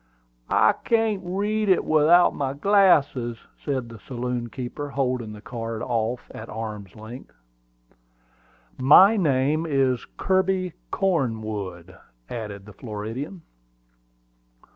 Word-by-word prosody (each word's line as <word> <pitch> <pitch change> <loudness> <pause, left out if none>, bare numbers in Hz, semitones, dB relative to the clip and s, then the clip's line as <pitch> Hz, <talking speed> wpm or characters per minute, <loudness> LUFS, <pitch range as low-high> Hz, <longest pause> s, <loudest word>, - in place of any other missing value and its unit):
"I - - +5
can't 225 -4 +1
read 205 +4 -1
it 185 - +3
without 155 +3 +5
my 135 -1 -2
glasses," 145 - +3 0.3
said 130 -5 -2
the 115 -1 -11
saloon 125 0 -4
keeper, 130 +4 -6
holding 125 -5 -1
the 105 - -11
card 115 -3 -5
off 120 0 -1
at 110 - -9
arm's 105 -4 -6
length. 110 - -11 1.4
"My 185 +11 +7
name 155 -2 +1
is 135 -4 +1
Kirby 190 -2 +1 0.2
Cornwood," 110 - -2 0.4
added 105 -4 -6
the 105 - -12
Floridian. 115 - -6
130 Hz, 105 wpm, -24 LUFS, 115-170 Hz, 1.4 s, My